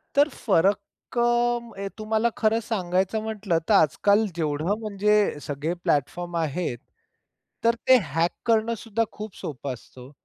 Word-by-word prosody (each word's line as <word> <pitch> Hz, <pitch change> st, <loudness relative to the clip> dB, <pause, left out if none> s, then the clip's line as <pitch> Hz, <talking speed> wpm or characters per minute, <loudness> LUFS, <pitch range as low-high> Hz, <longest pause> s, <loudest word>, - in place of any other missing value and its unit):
तर 285 Hz, +2 st, +5 dB
फरक 195 Hz, -, +2 dB, 0.4 s
अ, 240 Hz, -3 st, +1 dB
तुम्हाला 220 Hz, +2 st, +1 dB
खरं 220 Hz, 0 st, +2 dB
सांगायचं 190 Hz, 0 st, 0 dB
म्हटलं, 210 Hz, -5 st, -1 dB
तर -, -, +5 dB
आज-काल 200 Hz, +5 st, +4 dB
जेवढं 160 Hz, +5 st, -1 dB
म्हणजे 210 Hz, -4 st, +1 dB
सगळे 145 Hz, +4 st, -3 dB
प्लॅटफॉर्म 175 Hz, +5 st, -1 dB
आहेत, 160 Hz, -4 st, -2 dB, 0.9 s
तर 230 Hz, 0 st, +4 dB
ते 260 Hz, -, +8 dB, 0.2 s
हॅक 165 Hz, +1 st, +2 dB
करणं 230 Hz, 0 st, +2 dB
सुद्धा 230 Hz, +1 st, -1 dB
खूप 210 Hz, -2 st, -8 dB
सोपं 140 Hz, -2 st, -5 dB
असतं 125 Hz, +1 st, -14 dB
हो. 130 Hz, +3 st, -12 dB
200 Hz, 135 wpm, -25 LUFS, 165-225 Hz, 0.9 s, ते